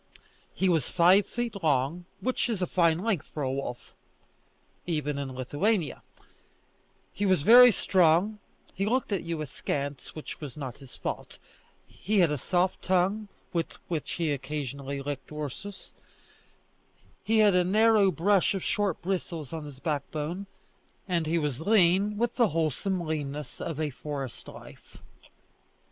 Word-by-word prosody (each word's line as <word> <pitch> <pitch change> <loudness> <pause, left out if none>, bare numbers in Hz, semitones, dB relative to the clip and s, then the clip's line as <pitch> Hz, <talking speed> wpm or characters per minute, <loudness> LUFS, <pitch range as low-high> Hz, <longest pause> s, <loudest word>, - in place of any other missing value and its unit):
He 190 - +1
was 165 -7 +2
five 185 +3 +5
feet 235 -4 -4
long, 150 +3 +1 0.2
which 255 -1 0
is 205 -5 -1
a - - +3
fine 170 -2 +2
length 205 -9 -1
for 150 - -4
a 130 - 0
wolf, 135 -3 -5 0.9
even 150 -4 -1
in 135 -2 -5
Lithuania; 150 - 0 1.1
he 205 - -1
was 185 -6 +3
very 245 +5 +9
strong; 185 +2 +3 0.3
he 195 +2 -1
looked 250 +1 0
at 195 - 0
you 165 -2 -4
askance, 140 -1 -4
which 155 - -8
was 145 -4 -7
not 130 -5 -6
his 135 -3 -12
fault; - - -5 0.5
he 210 +3 -2
had 175 -5 +5
a 150 - 0
soft 180 +6 0
tongue, 190 +4 +1 0.3
with 165 -1 -1 0.2
which 160 -4 -3
he 165 -3 0
occasionally 140 -1 -4
licked 145 0 -5
Ursus; 150 +7 -7 1.3
he 225 +1 +2
had 210 -2 +6
a 180 0 +4
narrow 210 +1 +4
brush 195 +2 +2
of 190 - -3
short 205 -5 0
bristles 170 -5 -3
on 160 -2 -5
his 145 -3 -9
backbone, 155 +5 -3 0.6
and 170 -4 0
he 165 +2 +1
was 150 -4 -2
lean 200 +1 +3
with 235 +1 -1
the 235 -3 +5
wholesome 165 +3 -1
leanness 150 -2 -4
of 160 -3 -4
a 155 -2 -1
forest 135 -2 -6
life. - - -13
170 Hz, 150 wpm, -28 LUFS, 145-195 Hz, 1.3 s, very